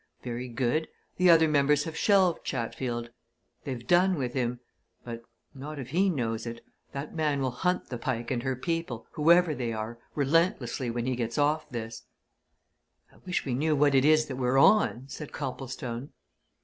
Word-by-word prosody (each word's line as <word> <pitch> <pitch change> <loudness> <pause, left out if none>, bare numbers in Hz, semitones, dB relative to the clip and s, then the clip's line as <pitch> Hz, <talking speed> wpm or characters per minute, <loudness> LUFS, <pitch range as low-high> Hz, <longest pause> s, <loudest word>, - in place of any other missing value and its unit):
Very 125 0 -4
good 125 +6 0 0.3
the 180 0 +4
other 165 -1 +7
members 150 0 +3
have 160 -1 -6
shelved 190 -2 +3
Chatfield. 120 -1 -3 0.5
They've 125 -4 -5
done 180 +5 +4
with 125 -3 -2
him. 125 -2 -1 0.5
But 115 -1 -6 0.3
not 145 +3 -7
if 130 -3 -6
he 190 +4 +3
knows 115 -7 -2
it! 115 0 -7 0.3
That 140 +2 -6
man 150 -3 0
will 130 -1 0
hunt 180 +8 -1
the 125 - -5
Pike 120 0 -3
and 120 -2 0
her 130 +1 -1
people 165 -4 -3
whoever 170 +2 +4
they 120 -4 -3
are 110 +2 -5 0.2
relentlessly 140 -4 +1
when 120 0 -2
he 130 0 0
gets 120 -1 -3
off 150 +2 +1
this." 115 -3 -6 1.1
"I - - -20
wish 180 - -1
we 130 - -2
knew 150 +5 +1
what 145 0 +3
it 135 -1 +5
is 155 +1 +5
that 130 -3 -6
we're 130 0 +1
on!" 140 - +4
said 140 +2 -8
Copplestone. 130 -2 -5
135 Hz, 175 wpm, -28 LUFS, 120-155 Hz, 1.1 s, other